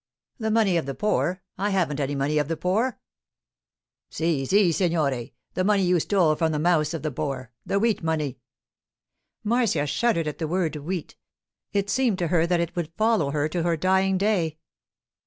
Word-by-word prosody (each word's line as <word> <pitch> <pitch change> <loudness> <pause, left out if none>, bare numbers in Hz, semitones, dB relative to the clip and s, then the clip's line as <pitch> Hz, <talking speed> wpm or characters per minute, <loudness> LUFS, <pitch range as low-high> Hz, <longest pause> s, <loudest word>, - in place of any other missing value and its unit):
'The 220 -1 -1
money 215 -5 +3
of 160 - -2
the 135 - -3
poor? 185 -3 0 0.2
I 205 +2 +1
haven't 175 -7 0
any 140 0 -1
money 145 +2 +1
of 150 - 0
the 165 0 -2
poor.' 220 +8 0 1.1
'Si, 160 -4 -1
si, 195 0 +4
signore. 155 -9 0 0.2
The 185 - 0
money 200 0 +3
you 180 -1 +3
stole 175 -3 +3
from 160 +1 +1
the 155 - -1
mouths 160 0 +2
of 160 - -6
the 155 - -1
poor—the 130 - -4
wheat 225 0 +1
money.' 155 -5 -2 1.0
Marcia 220 -9 +1
shuddered 165 +3 +1
at 150 -1 -5
the 160 - -1
word 165 -2 0
'wheat.' 160 +3 -5 0.5
It 200 -1 0
seemed 250 -7 +2
to 175 -3 -1
her 170 -1 +2
that 175 0 +2
it 170 +1 -2
would 170 -2 -3
follow 215 -9 +2
her 145 +1 0
to 175 +2 -2
her 170 0 +1
dying 190 +2 +2
day. 185 -6 0
170 Hz, 180 wpm, -25 LUFS, 150-195 Hz, 1.1 s, si